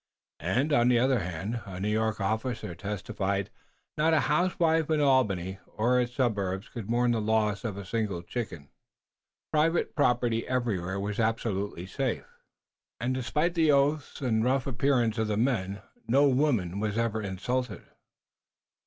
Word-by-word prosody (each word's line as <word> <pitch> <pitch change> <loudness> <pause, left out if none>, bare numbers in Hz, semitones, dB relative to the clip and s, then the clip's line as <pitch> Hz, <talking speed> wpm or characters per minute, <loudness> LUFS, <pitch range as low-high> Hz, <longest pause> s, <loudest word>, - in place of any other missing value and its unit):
And, 125 - 0
on 120 -4 +4
the 125 -1 +5
other 130 +1 +3
hand, 95 +6 -4
a 95 -2 -6
New 105 +2 -1
York 110 0 0
officer 110 0 -2
testified 100 0 -2
that - - -24 0.5
not 165 +1 +4
a 155 - +4
housewife 165 -1 +2
in 155 -1 +2
Albany 100 -10 +2
or 125 +3 +2
its 125 0 -3
suburbs 100 -5 -1
could 115 -4 -7
mourn 120 +1 +2
the 115 -2 0
loss 105 -1 +1
of 105 -5 -3
a 100 - -6
single 100 -4 -2
chicken. 90 - -6 0.8
Private 160 +2 +2
property 120 -5 +1
everywhere 100 -7 -1
was 105 +2 -3
absolutely 105 -5 -1
safe, 130 +6 -2 0.7
and, 120 +2 0
despite 150 +7 0
the 160 -3 +4
oaths 145 +1 +1
and 110 -4 +1
rough 130 +2 +1
appearance 125 -3 +1
of 110 - +1
the 105 -1 -1
men, 100 -5 0 0.2
no 140 +4 +5
woman 125 - +1
was 105 0 -1
ever 115 -1 0
insulted. 105 +4 -3
115 Hz, 155 wpm, -28 LUFS, 100-130 Hz, 0.8 s, the